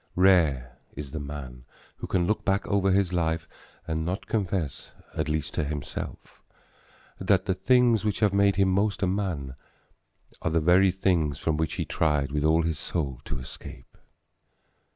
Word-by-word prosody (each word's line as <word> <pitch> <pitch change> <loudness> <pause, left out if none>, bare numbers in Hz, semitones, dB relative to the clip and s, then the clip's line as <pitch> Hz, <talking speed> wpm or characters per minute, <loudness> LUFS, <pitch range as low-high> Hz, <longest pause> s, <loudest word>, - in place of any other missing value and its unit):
Rare 80 -10 +3 0.2
is 70 -1 -7
the 80 - -4
man 70 -4 -7 0.3
who - - -6
can 90 -2 +1
look 105 +4 0
back 100 0 +1
over 100 -1 +1
his 95 -1 +2
life 80 -2 0 0.4
and 80 0 -1
not 90 +5 -3
confess, 90 -9 -2 0.2
at 80 0 -1
least 75 -1 -2
to - - 0
himself, 75 -1 -6 0.8
that 95 0 +2
the 95 - +1
things 115 +3 +3
which 105 -2 -1
have 105 -3 +3
made 100 0 +4
him 95 -1 +3
most 100 +2 +1
a - - +3
man 90 -9 -2 0.9
are - - 0
the 80 +1 +2
very 90 +4 +5
things 85 -6 +1
from 80 +1 -1
which 80 0 -1
he - - -2
tried 75 -3 0
with 75 0 -1
all 80 +2 +3
his 80 -2 -2
soul 70 -7 -3
to - - -4
escape. 65 - -11
85 Hz, 170 wpm, -27 LUFS, 75-95 Hz, 0.9 s, very